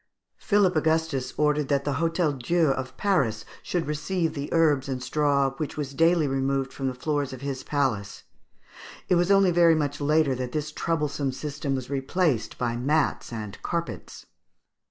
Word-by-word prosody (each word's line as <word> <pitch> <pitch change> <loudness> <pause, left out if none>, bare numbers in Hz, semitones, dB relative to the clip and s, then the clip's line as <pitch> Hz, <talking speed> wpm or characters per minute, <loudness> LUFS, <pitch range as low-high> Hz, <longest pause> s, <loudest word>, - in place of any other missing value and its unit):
Philip 200 -4 +2
Augustus 160 -4 0
ordered 150 -1 +2
that 140 -1 0
the 145 - 0
Hôtel 165 -5 0
Dieu 165 +2 +2
of 130 -1 -4
Paris 135 - +1 0.2
should 175 -2 -2
receive 155 +3 -1
the 145 -2 -5
herbs 150 -5 +2
and 130 - -1
straw 140 0 +1
which 150 0 -4
was 140 -2 -4
daily 165 +1 +3
removed 135 0 -1
from 135 - -3
the 130 - -2
floors 145 0 -2
of 130 - -9
his 140 -2 -4
palace. 125 -10 -2 0.9
It - - +4
was 175 +1 +3
only 195 -2 +5
very 170 -1 +5
much 145 -1 -2
later 150 -1 +3
that 125 -1 -4
this 150 0 -2
troublesome 150 -4 -1
system 140 0 -3
was 130 0 -5
replaced 140 -1 0
by 120 -1 -1
mats 145 +4 0
and 105 -3 -7
carpets. 170 -1 -5
145 Hz, 165 wpm, -26 LUFS, 135-160 Hz, 0.9 s, only